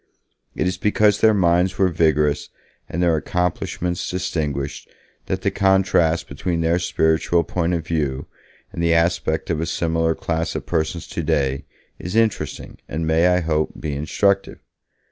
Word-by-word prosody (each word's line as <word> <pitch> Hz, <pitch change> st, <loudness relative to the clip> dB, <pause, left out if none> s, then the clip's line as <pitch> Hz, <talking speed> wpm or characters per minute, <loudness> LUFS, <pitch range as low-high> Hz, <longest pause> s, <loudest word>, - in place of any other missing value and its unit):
It -, -, -1 dB
is 90 Hz, -, -1 dB
because 105 Hz, 0 st, +2 dB
their 110 Hz, -, +6 dB
minds 90 Hz, 0 st, +2 dB
were 95 Hz, -1 st, +3 dB
vigorous 75 Hz, -3 st, +1 dB, 0.4 s
and 85 Hz, +2 st, -1 dB
their 85 Hz, -2 st, +3 dB
accomplishments 90 Hz, +2 st, -2 dB
distinguished 75 Hz, -7 st, -3 dB, 0.4 s
that -, -, -2 dB
the -, -, +1 dB
contrast 95 Hz, -4 st, +2 dB
between 85 Hz, +4 st, -2 dB
their 85 Hz, +2 st, +2 dB
spiritual 85 Hz, 0 st, +1 dB
point 90 Hz, 0 st, -1 dB
of 80 Hz, -2 st, -4 dB
view 75 Hz, -4 st, -2 dB, 0.5 s
and -, -, -4 dB
the 85 Hz, 0 st, +3 dB
aspect 85 Hz, -1 st, 0 dB
of 80 Hz, -1 st, -1 dB
a 85 Hz, -, -2 dB
similar 80 Hz, 0 st, 0 dB
class 80 Hz, 0 st, -2 dB
of -, -, -4 dB
persons 80 Hz, 0 st, -2 dB
today 70 Hz, -1 st, -1 dB, 0.3 s
is 90 Hz, +4 st, -5 dB
interesting 115 Hz, -2 st, -1 dB
and 80 Hz, +2 st, -2 dB
may, 80 Hz, +2 st, +3 dB
I 90 Hz, 0 st, +3 dB
hope, 80 Hz, -1 st, 0 dB
be 75 Hz, -, -3 dB
instructive. 95 Hz, +7 st, 0 dB
85 Hz, 150 wpm, -21 LUFS, 80-90 Hz, 0.5 s, their